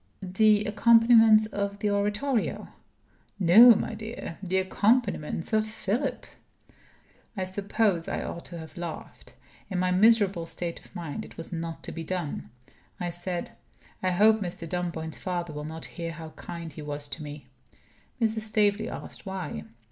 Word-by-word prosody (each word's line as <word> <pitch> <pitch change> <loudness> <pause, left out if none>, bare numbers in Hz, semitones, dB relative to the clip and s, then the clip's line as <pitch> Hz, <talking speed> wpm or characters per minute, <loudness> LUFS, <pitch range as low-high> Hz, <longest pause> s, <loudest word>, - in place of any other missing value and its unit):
"The 210 +3 +3
accompaniments 225 0 +6
of 200 -1 -3
the 205 0 0
Oratorio?" 210 +5 -1 0.7
"No, 215 +6 +9
my 220 - -2
dear. 215 -5 -7
The 190 -1 -1
accompaniments 190 -3 +1
of 215 0 +3
Philip." 220 +5 -2 1.1
I 190 - -1
suppose 195 -2 0
I - - -2
ought 170 - -6
to 170 - -8
have 160 +1 -10
laughed. 170 -2 -8 0.3
In 190 - -2
my 180 0 +1
miserable 195 -3 +4
state 170 0 -4
of - - -20
mind, 165 -5 -5
it - - -13
was 165 - -6
not 165 -1 -5
to - - -5
be 165 - -6
done. 170 -3 -4 0.5
I 175 -1 -2
said: 175 0 -2 0.5
"I 185 - +1
hope 215 +4 +4
Mr. 175 -3 -4
Dunboyne's 165 -2 -4
father 175 -3 -3
will 150 0 -5
not 160 +1 -7
hear 170 -1 -6
how 160 0 -8
kind 170 -1 -8
he 155 - -8
was 145 -1 -4
to 140 +4 -6
me." 145 -1 -8 0.7
Mrs. 220 -1 +1
Staveley 215 -1 +1
asked - - -9
why. 180 - -5
185 Hz, 155 wpm, -27 LUFS, 165-215 Hz, 1.1 s, No